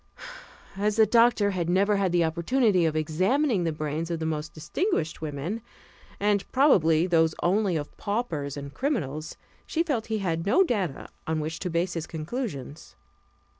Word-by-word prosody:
As 210 +1 +1
the 220 0 +6
doctor 230 -2 +4
had 175 -3 -2
never 200 +3 +3
had 195 -2 +1
the 175 -1 +3
opportunity 180 +3 +2
of 155 - -2
examining 185 - +1
the 165 - +1
brains 155 +2 -3
of 170 - -1
the 160 - -4
most 155 -1 -3
distinguished 160 - -2
women, 155 +8 -4 0.6
and, 205 -1 0
probably, 175 - +4
those 165 -3 +2
only 190 0 +2
of 145 -2 -4
paupers 165 - -3
and 140 0 -7
criminals, 160 - -3 0.3
she 330 - 0
felt 265 -10 -2
he 220 -1 -1
had 165 -5 -1
no 205 - +4
data 195 - -2 0.2
on 160 0 0
which 155 +2 -4
to 180 - -3
base 170 +2 0
his 165 -2 -4
conclusions. 160 - -6
175 Hz, 165 wpm, -26 LUFS, 155-215 Hz, 0.6 s, the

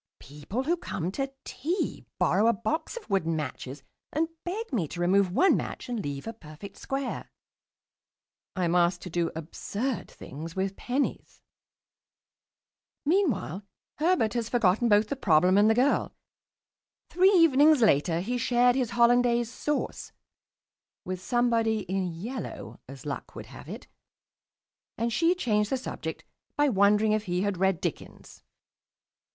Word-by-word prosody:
People 150 - -5
who 340 +5 +1
come 180 - -4
to 270 +5 -3
tea 335 +9 -3
borrow 215 - +3
a 235 - +5
box 315 - -3
of 475 - -9
wooden 175 -5 0
matches 135 -2 -5 0.3
and 320 +3 0
beg 400 0 -5
me 185 -10 0
to 175 - -8
remove 185 +1 +3
one 375 - +4
match - - -4
and 240 -3 -3
leave 140 -1 -5
a 225 - -5
perfect 180 0 -12
square. 270 -1 -4 1.3
I 185 -2 0
am 170 - 0
asked 175 0 +2
to 180 - -7
do 170 0 0
absurd 205 - -4
things 160 +5 -9
with 190 +1 -2
pennies.... 265 +3 -3 1.7
Meanwhile 280 - +1 0.4
Herbert 315 - +2
has 235 -2 -2
forgotten 230 0 +2
both 210 0 +4
the 280 - -1
problem 180 - +3
and 205 +2 +5
the 220 - +4
girl. 260 +4 +1 1.0
Three 370 +2 +5
evenings 305 -3 +6
later 165 -3 +3
he 245 +6 -2
shared 245 +1 +3
his 255 -4 0
Hollandaise 240 -1 +3
sauce 295 +3 -3 0.9
with 185 0 -4
somebody 230 -2 +1
in 190 0 -2
yellow 170 - -6
(as 135 0 -10
luck 145 - -6
would - - -7
have - - -12
it) - - -8 1.1
and 230 0 -1
she 335 +8 +3
changed 210 - 0
the 265 - 0
subject 255 - -6 0.3
by 290 0 +3
wondering 210 0 +3
if 215 0 0
he 180 +2 -1
read 190 -2 +1
Dickens. - - -6
215 Hz, 145 wpm, -27 LUFS, 180-260 Hz, 1.7 s, evenings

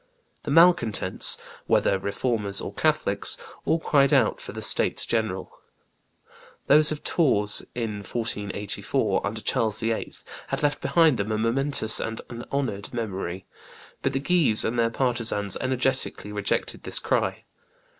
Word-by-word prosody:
The - - -7
malcontents, 165 - +5 0.3
whether 100 - +2
Reformers 100 0 -1
or - - -6
Catholics, - - -1 0.3
all 160 - +2
cried 140 -3 +2
out 130 -7 +2
for - - -6
the - - -8
states - - +2
general. 110 -5 -3 1.1
Those 150 +1 +7
of 150 - -5
Tours, 105 - +1
in 115 -3 -3
1484, 105 -1 -3
under 110 +2 -5
Charles 110 -1 +1
VIII., 115 -1 -2 0.3
had - - -4
left 145 0 0
behind 160 -6 +3
them 100 +2 -2
a 110 - -1
momentous 115 0 +2
and 115 0 -4
an 120 0 -8
honored 120 -8 -3
memory. 95 -5 -5 0.6
But 135 - -1
the 135 - -1
Guises 145 -7 +3
and 120 +1 -1
their 115 0 +2
partisans 115 -5 -1
energetically 130 -4 -1
rejected 105 -1 -2
this - - -3
cry. - - -1
115 Hz, 135 wpm, -24 LUFS, 105-135 Hz, 1.1 s, Those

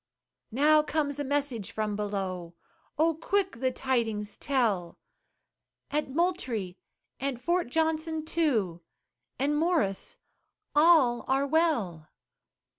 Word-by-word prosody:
Now 300 +6 +4
comes 295 -1 -1
a - - 0
message 275 -7 -2
from 215 -1 -2
below 190 -4 -4 0.4
Oh 325 +2 +3
quick 380 -1 -1
the 260 0 +1
tidings 225 -6 -1
tell 220 - 0 0.9
"At 300 -1 -1
Moultrie 260 - -1 0.4
and 270 -2 -2
Fort 345 +6 0
Johnson, 320 +1 0
too, 230 - 0 0.6
And 285 +3 +1
Morris, 300 - 0 0.6
all 295 -6 +5
are 270 +1 +2
well!" 265 - 0
275 Hz, 105 wpm, -28 LUFS, 210-315 Hz, 0.9 s, all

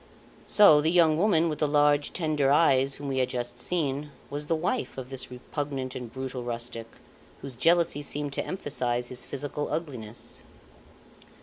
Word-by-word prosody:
So 155 -8 +7
the 155 - +2
young 165 -3 +4
Woman 170 -2 +3
with 150 -2 -3
the 150 - +2
large, 145 0 +3
tender 155 -5 0
eyes, 135 -3 +4
whom 145 - -7
we 135 -1 -1
had 130 - +1
just 120 0 -4
seen, 150 -2 -1 0.2
was 145 +1 -4
the 165 - +2
wife 180 - -2
of 130 0 -7
this 130 -1 -5
repugnant 130 +1 -5
and 125 -3 -7
brutal 130 0 -5
rustic, 120 -1 -5 0.6
whose 135 -2 -7
jealousy 165 +2 +3
seemed 145 0 -3
to - - -1
emphasise 125 -8 -2
his 125 -1 -6
physical 145 +1 -4
ugliness. 125 -9 -6
145 Hz, 165 wpm, -27 LUFS, 125-155 Hz, 0.6 s, So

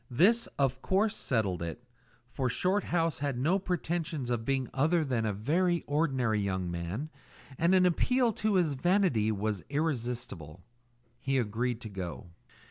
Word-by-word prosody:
This, 195 - +4
of 130 -2 +1
course, 200 +3 +1
settled 100 -8 -1
it, 85 +8 -5 0.5
for 130 -2 -1
Shorthouse 175 - 0
had 140 -3 -2
no 165 +10 +2
pretensions 170 -6 -2
to 120 -2 +1
being 130 +2 -1
other 155 +4 +2
than 120 -5 0
a - - +1
very 165 - +1
ordinary 135 -7 +1
young 95 -3 -2
man, 90 - -4 0.5
and 170 +3 +4
an 185 -1 +5
appeal 240 +7 +2
to 215 0 0
his 170 -5 +2
vanity 140 - +2
was 105 -3 -2
irresistible. 120 - -3 0.6
He 135 0 0
agreed 120 +1 -1
to 110 - -7
go. 90 -7 -6
135 Hz, 145 wpm, -30 LUFS, 110-170 Hz, 0.6 s, an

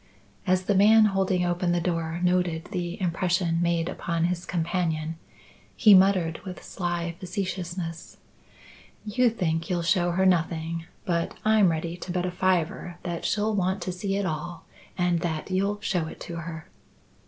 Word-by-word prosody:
As 185 0 +3
the 200 - +1
man 215 +3 +6
holding 190 -2 +1
open 175 0 0
the 175 - +2
door 165 -1 -2
noted 180 -2 +1
the 180 0 -3
impression 175 -1 0
made 170 -1 +1
upon 170 -2 -2
his 175 0 -1
companion, 165 -2 -1 0.6
he 215 -4 +7
muttered 185 -4 +4
with 185 -2 -8
sly 175 -2 -3
facetiousness: 180 -3 -4 0.9
"You 240 +4 +3
think 165 -6 -1
you'll 175 -2 0
show 175 0 +2
her 185 +2 +1
nothing; 165 -2 +1 0.2
but 170 -2 -1
I'm 215 -3 +5
ready 165 +1 -2
to 180 - -6
bet 180 0 -1
a 180 - -2
fiver 180 -1 0
that 175 -2 -4
she'll 215 +1 +1
want 190 -1 0
to 185 - -3
see 195 +2 -2
it 200 0 0
all 165 +1 -4 0.3
and 175 -2 +2
that 165 0 -3
you'll 200 +2 0
show 175 -6 -1
it - - -9
to 170 - -6
her." 160 -1 -6
175 Hz, 160 wpm, -26 LUFS, 170-190 Hz, 0.9 s, he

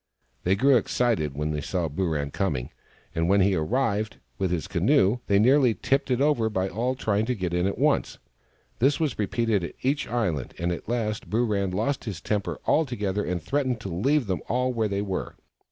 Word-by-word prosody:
They 95 +2 +4
grew 135 +5 +5
excited 110 - 0
when 75 +1 -2
they 75 -1 -2
saw 85 +2 -1
Booran 75 -3 -2
coming, 70 -12 -1 0.4
and 85 0 0
when 100 +1 +5
he 95 +1 +3
arrived, 105 +4 0 0.2
with 95 - +1
his 85 -3 -2
canoe, 100 +6 +3
they 100 - +4
nearly 125 +2 +4
tipped 135 0 0
it 125 -1 +1
over 140 -6 +2
by 95 -2 -1
all 120 +7 -1
trying 110 -3 0
to 125 - 0
get 90 -4 -3
in 90 +1 +1
at 100 - -2
once. - - +1 0.6
This 135 +6 +3
was 155 -8 -1
repeated 105 -1 +1
at 85 - -6
each 140 +3 0
island, 105 - -2
and 85 +1 -1
at 85 - -5
last 110 -6 -2
Booran 105 -3 +1
lost 115 +11 -1
his 100 -7 -4
temper 105 +1 -2
altogether 105 -10 +1
and 90 -1 -2
threatened 130 - -1
to 100 - -5
leave 130 - +1
them 95 -3 -2
all 125 +1 +1
where 110 -2 0
they 100 0 -1
were. 95 -2 -4
105 Hz, 195 wpm, -26 LUFS, 90-125 Hz, 0.6 s, grew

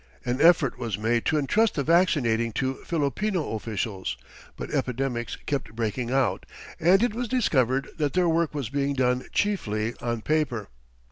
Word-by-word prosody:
An 125 +3 -1
effort 165 -6 +5
was 115 -5 -2
made 115 +2 0
to 155 - +2
entrust 210 +10 +2
the 140 - 0
vaccinating 130 -9 +2
to 130 +4 0
Filipino 165 - -1
officials, 105 - -3 0.4
but - - -6
epidemics 125 -1 -2
kept 140 -6 -3
breaking 115 +1 -2
out, 125 -7 0 0.3
and 190 +6 +5
it 240 - +1
was 240 +2 -3
discovered 135 - +1
that 150 -3 0
their 180 -1 +3
work 165 -2 +1
was 135 -7 -3
being 140 +1 -1
done 125 -1 +1
chiefly 115 - 0
on 120 -2 -2
paper. 140 -9 0
135 Hz, 155 wpm, -26 LUFS, 115-165 Hz, 0.4 s, effort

